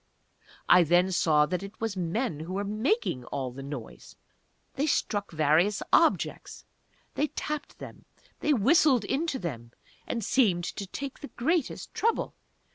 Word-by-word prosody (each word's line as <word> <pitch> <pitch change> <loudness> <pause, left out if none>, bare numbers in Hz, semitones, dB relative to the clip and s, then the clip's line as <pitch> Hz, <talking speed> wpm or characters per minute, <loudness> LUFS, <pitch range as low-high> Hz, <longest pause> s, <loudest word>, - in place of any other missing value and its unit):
I 180 - +7
then 175 +3 +3
saw 155 -4 +3
that 180 +3 -2
it 200 +2 -10
was 225 -3 -2
men 185 - -2
who 165 +4 -6
were 200 +1 -1
making 215 - 0
all 130 -1 -4
this 135 +2 -9
noise. 135 -5 -8 0.6
They 285 +3 -1
struck 205 -7 0
various 160 +6 +2
objects - - +1 0.5
they 300 - 0
tapped 300 0 -5
them - - -11 0.3
they 300 - +1
whistled 265 - +4
into 285 +4 -1
them 120 - -6 0.3
and 230 -4 -2
seemed 200 -10 +2
to 200 +3 -5
take 275 +7 -6
the 285 - -7
greatest 310 +4 -2
trouble! 455 +1 0
200 Hz, 145 wpm, -28 LUFS, 165-265 Hz, 0.6 s, I